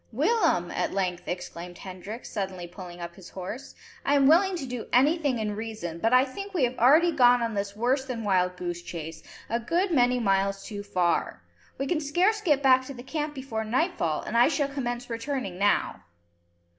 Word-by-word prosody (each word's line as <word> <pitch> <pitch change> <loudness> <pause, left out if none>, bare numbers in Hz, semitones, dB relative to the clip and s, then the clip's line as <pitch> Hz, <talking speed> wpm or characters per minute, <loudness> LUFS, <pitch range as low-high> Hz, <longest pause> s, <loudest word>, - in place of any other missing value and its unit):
"Willem!" 300 - +2
at - - -2
length 180 -2 -2
exclaimed 175 0 -6
Hendrik, 195 +5 -8
suddenly 190 -4 -4
pulling 175 0 -10
up 170 0 -6
his 180 -1 -13
horse, 195 +7 -7 0.3
"I 285 - +2
am 275 -1 +4
willing 360 +6 +5
to 330 - -4
do 250 -2 -5
anything 285 +1 +3
in 210 -2 -2
reason, 215 -7 -5
but 225 +6 +1
I 255 +1 +6
think 395 +9 -8
we 315 - +2
have 250 0 +1
already 310 +8 +6
gone 245 -4 +5
on 230 -1 -2
this 200 0 -3
worse 250 +5 +1
than 245 -4 -4
wild 180 -3 +1
goose 175 -1 -4
chase, 160 -2 -7 0.3
a 235 - -1
good 345 - 0
many 250 -4 +3
miles 195 -2 +1
too 205 -2 -6
far. 180 -4 0 0.3
We 275 - -2
can 310 +2 0
scarce 360 +9 +2
get 295 -8 +2
back 260 -1 +6
to 275 - -7
the 245 - -9
camp 295 +2 -3
before 260 -5 -4
nightfall, 235 - 0
and 220 - -5
I 240 +1 +6
shall 290 -2 0
commence 245 -3 -3
returning 230 -5 -4
now." 205 +1 +1
235 Hz, 195 wpm, -27 LUFS, 190-280 Hz, 0.3 s, I